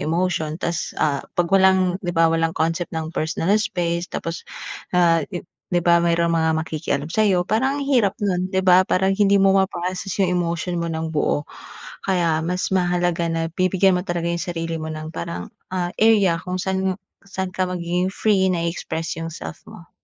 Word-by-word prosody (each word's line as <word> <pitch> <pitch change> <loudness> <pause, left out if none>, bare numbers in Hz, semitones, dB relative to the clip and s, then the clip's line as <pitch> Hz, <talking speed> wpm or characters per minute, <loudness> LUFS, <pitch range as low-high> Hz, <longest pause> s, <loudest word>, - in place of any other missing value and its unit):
emotion 165 -2 0
ta's, 170 -1 -3
ah, 145 -3 +1 0.2
'pag 175 0 0
walang 190 -1 +4
di 175 - -6
ba, 165 -1 +3
walang 165 0 0
concept 165 +2 0
ng 160 +1 -4
personal 165 +4 0
space 170 -2 -2
tapos, 165 0 -5 0.5
ah, 165 -2 +4
i 180 -3 -6 0.3
di 175 - +2
ba, 170 0 +4
mayro'ng 170 0 +2
mga 160 0 +2
makikialam 150 -2 -2
sa'yo 185 -1 +2
parang 265 +6 +1
ang 280 - -3
hirap 240 -8 +2
nun, 185 -2 -1
di 190 - 0
ba? 185 0 +6
Parang 190 +1 +1
hindi 200 0 +4
mo 195 0 +4
ma-process 185 0 -1
yung 195 - +4 0.2
emotion 170 +1 -2
mo 170 - -2
ng 160 0 -3
buo, 145 0 0 0.6
kaya 170 -4 +1
mas 180 +3 -1
mahalaga 175 -2 +1
na 165 0 -1
bibigyan 185 0 +3
mo 180 - 0
talaga 175 -3 -2
yung 170 0 -1
sarili 165 -2 -3
mo 160 - -4
ng 155 0 -7
parang, 85 +1 -5 0.2
ah, 180 -1 -2
area 200 -7 +3
kung 185 0 -3
saan 190 0 -1 0.2
saan 190 -1 -5
ka 185 -1 -1
magiging 180 +1 -1
free, 195 -2 +2
na 170 -2 0
i-express 165 -1 -3
yung 165 - -4
self 165 - -8
mo. 170 - -13
175 Hz, 185 wpm, -22 LUFS, 165-190 Hz, 0.6 s, ba